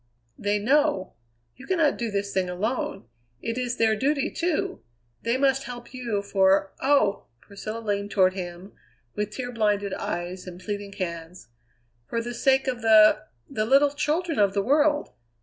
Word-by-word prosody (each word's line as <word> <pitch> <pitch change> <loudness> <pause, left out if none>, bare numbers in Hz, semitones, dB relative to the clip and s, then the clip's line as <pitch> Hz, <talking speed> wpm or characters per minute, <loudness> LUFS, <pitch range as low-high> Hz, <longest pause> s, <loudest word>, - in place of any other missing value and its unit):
They 205 +1 +1
know 275 -1 +1 0.4
you 265 - -13
cannot 330 -6 +2
do 235 -1 -1
this 200 -1 -2
thing 185 -1 0
alone; 200 - -2 0.3
it 230 - -3
is 245 -1 -2
their 220 -1 +3
duty, 275 +5 0
too 340 -2 -1 0.4
they 235 +2 0
must 270 0 +2
help 240 0 -9
you, 235 -5 -2
for, 195 -1 +2
oh!" 265 -8 +2
Priscilla 215 - -7
leaned 205 -2 -2
toward 185 -2 +3
him 180 +1 -7 0.4
with 210 0 -2
tear 245 +3 -5
blinded 205 -3 0
eyes 180 +2 -4
and 180 0 -8
pleading 205 +1 -5
hands 170 - -6 0.6
"For 230 - -2
the 240 +1 -4
sake 265 +2 +2
of 250 -2 -2
the 215 -1 +6 0.2
the 215 - -2
little 275 +3 +5
children 310 +2 -1
of 200 -1 +3
the 200 - +1
world. 295 +4 +2
215 Hz, 160 wpm, -25 LUFS, 200-265 Hz, 0.6 s, the